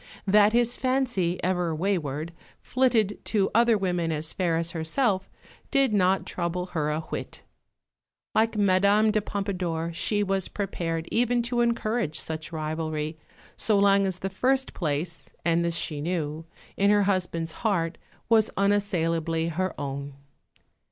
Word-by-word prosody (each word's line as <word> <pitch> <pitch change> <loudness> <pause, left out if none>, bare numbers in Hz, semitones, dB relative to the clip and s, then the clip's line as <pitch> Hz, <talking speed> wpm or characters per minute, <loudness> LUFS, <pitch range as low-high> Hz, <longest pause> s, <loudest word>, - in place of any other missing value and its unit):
That 205 +1 +5
his 240 +1 +2
fancy, 250 -9 0
ever 180 -3 0
wayward, 160 -3 -2 0.3
flitted 230 -6 +1
to 200 -3 +1
other 235 0 +4
women 175 -4 -1
as 155 0 -2
fair 170 -3 0
as 165 0 -1
herself, 190 +4 0 0.4
did 275 -5 +2
not 190 -1 +2
trouble 175 0 -2
her 150 -3 0
a 155 +1 -1
whit. 160 - -6 0.9
Like 220 0 +2
Madame 200 +2 +4
de 215 0 +1
Pompadour, 180 -5 -3
she 205 +4 +1
was 195 -1 0
prepared 165 -5 -3
even 240 +1 +2
to 240 0 0
encourage 230 -7 0
such 160 0 -5
rivalry, 155 0 -3 0.4
so 215 -2 +2
long 200 0 +4
as 185 -2 -2
the 195 +1 -4
first 265 +6 +1
place 155 -1 -3 0.2
(and 170 0 +2
this 170 -1 0
she 150 -4 -3
knew) 160 -1 -3 0.3
in 200 +1 +3
her 205 0 +4
husband's 180 -4 -1
heart 180 -7 0 0.3
was 220 -2 +4
unassailably 170 -5 +1
her 185 +1 -2
own. 140 0 -5
185 Hz, 140 wpm, -26 LUFS, 165-210 Hz, 0.9 s, That